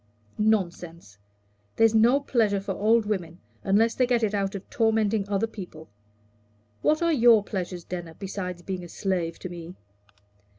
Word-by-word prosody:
"Nonsense! 175 - -1 0.6
there's 225 -1 +4
no 235 +5 +5
pleasure 225 -7 +1
for 195 0 -5
old 220 +3 +2
women, 180 -5 -3 0.2
unless 220 +4 +3
they 255 - +1
get 240 -2 +1
it 210 -1 +1
out 195 -1 -1
of 195 - -7
tormenting 220 -3 +1
other 200 +2 +1
people. 180 -8 -10 0.9
What 310 +2 +2
are 335 -1 +3
your 235 -6 +5
pleasures, 180 -3 -5
Denner 170 -2 -7
besides 180 -2 -6
being 185 0 -5
a 175 - -10
slave 175 -4 -2
to 185 - -7
me?" 175 0 -9
200 Hz, 155 wpm, -26 LUFS, 180-225 Hz, 0.9 s, no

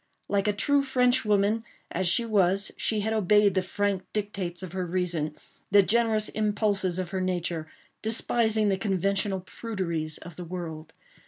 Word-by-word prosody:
Like 200 0 +1
a - - +4
true 285 +7 +2
Frenchwoman 235 -5 +2 0.3
as 185 +1 0
she 235 +7 +3
was 195 -2 +2
she 215 -2 -1
had 220 +2 -1
obeyed 210 -1 +4
the 190 - +2
frank 200 +1 -1
dictates 195 -4 -3
of 185 - -6
her 185 0 -2
reason—the 175 +2 0
generous 220 0 +2
impulses 205 -4 +1
of 185 -1 -3
her 190 -1 -2
nature—despising 205 +5 -1
the 195 - +1
conventional 195 0 0
pruderies 175 -7 -4
of 170 -1 -11
the 180 - -5
world. 165 -3 -6
195 Hz, 145 wpm, -27 LUFS, 180-215 Hz, 0.3 s, a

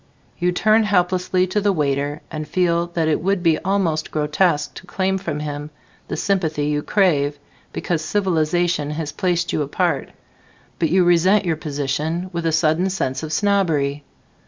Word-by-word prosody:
You 180 0 +2
turn 215 +5 +3
helplessly 185 -2 +1
to 195 +3 -1
the 205 0 +2
waiter 145 -3 -1
and 155 -1 -5
feel 170 +1 +1
that 165 -2 +1
it 155 - +1
would 190 0 0
be 165 -2 +3
almost 175 -5 0
grotesque 155 +1 +1
to 185 - -11
claim 190 +1 0
from 155 -6 -4
him 145 0 -5 0.4
the - - -4
sympathy 160 -7 0
you 150 0 0
crave 150 -7 +1 0.3
because 165 -3 -2
civilization 175 -4 0
has 150 0 -4
placed 175 -1 -1
you - - 0
apart, 145 -1 -1 0.7
but 165 - +1
you 185 +3 +4
resent 180 +4 +4
your 165 -2 +1
position 155 +4 -3
with 170 -1 -2
a - - +2
sudden 160 +3 +2
sense 130 -8 -2
of 155 -1 -5
snobbery. 155 -7 +1
170 Hz, 160 wpm, -21 LUFS, 150-185 Hz, 0.7 s, you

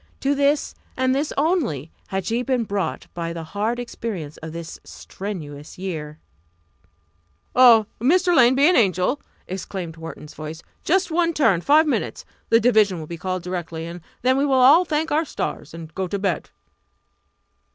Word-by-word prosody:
To 275 +1 +2
this, 285 +1 +1 0.2
and 260 0 +2
this 285 +3 -1
only, 275 - 0 0.2
had 190 -2 -3
she 235 +2 0
been 250 -2 0
brought 200 -2 -3
by 170 -1 -4
the 165 -1 -6
hard 205 +8 -2
experience 210 -10 -5
of 160 0 -8
this 165 0 -7
strenuous 155 -7 -8
year. 155 -5 -5 1.4
"Oh, 235 -4 +7
Mrs. 350 - +3
Lane, 250 -2 +6
be 280 +3 +5
an 360 - +4
angel!" 195 - +2 0.3
exclaimed 180 -2 -5
Wharton's 160 -2 -9
voice. 155 +1 -8 0.2
"Just 370 +1 +1
one 335 0 +2
turn 220 - +3
five 300 - +5
minutes! 295 - -2 0.2
The 230 - +6
division 215 -5 +3
will 155 - -6
be 170 - -6
called 185 +1 -3
directly, 170 -2 -4
and 170 +1 -8 0.2
then 260 +1 +3
we 275 - +2
will - - -1
all 275 +8 +7
thank 315 0 -1
our 310 +2 +3
stars 270 - -5
and 165 -1 -10
go 190 0 -2
to 200 - -2
bed!" 195 -3 -2
205 Hz, 165 wpm, -22 LUFS, 170-275 Hz, 1.4 s, Oh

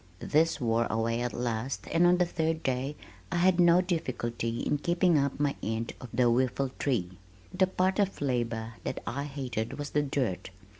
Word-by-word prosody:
This 160 - +2
wore 115 -2 +1
away 115 +1 0
at 120 0 -1
last 120 +1 -3
and 170 +1 +4
on 180 +1 +5
the 180 - +3
third 160 -1 -1
day 130 +3 -1 0.4
I - - -1
had 180 +1 +3
no 175 0 +6
difficulty 120 -9 -2
in 145 - 0
keeping 175 +2 +2
up 140 -1 +1
my 145 -1 +1
end 110 +1 -2
of 125 - -8
the 125 +2 +2
whiffletree. 125 -5 0 0.4
The 185 0 +3
part 185 +1 0
of 195 -1 +1
labor 115 -4 -1
that - - -4
I 140 +5 -3
hated 130 -6 -4
was 145 -1 -5
the 150 - +2
dirt. 135 -11 -2
135 Hz, 180 wpm, -29 LUFS, 115-165 Hz, 0.4 s, no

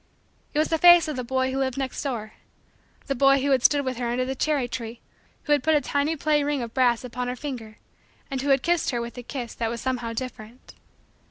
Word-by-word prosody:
It - - 0
was 310 - +2
the 325 - +1
face 345 -1 +8
of 305 - -3
the 255 - -3
boy 260 +1 0
who 265 - -2
lived 260 -1 -1
next 265 -2 -3
door 230 -6 -4 0.7
the 275 - -1
boy 275 +1 +4
who 280 - +1
had 260 -2 +3
stood 285 -1 +4
with 255 -2 -2
her 240 -1 -2
under 250 +1 0
the 265 - -2
cherry 280 -1 0
tree; 235 -1 -6 0.4
who 295 - -4
had 290 - +4
put 315 0 +3
a - - +5
tiny 285 +3 0
play 300 0 +1
ring 285 -3 -1
of 230 -1 -7
brass 245 -3 +2
upon 250 0 -4
her 250 - -3
finger; 245 -6 -7 0.5
and 265 -1 -2
who 285 - -2
had 270 -2 +3
kissed 345 -1 +1
her 240 - -1
with 235 0 -6
a - - -5
kiss 245 -1 -6
that 230 - -2
was 235 0 -4
somehow 245 -2 -2
different. 235 -1 -8
260 Hz, 245 wpm, -25 LUFS, 240-285 Hz, 0.7 s, face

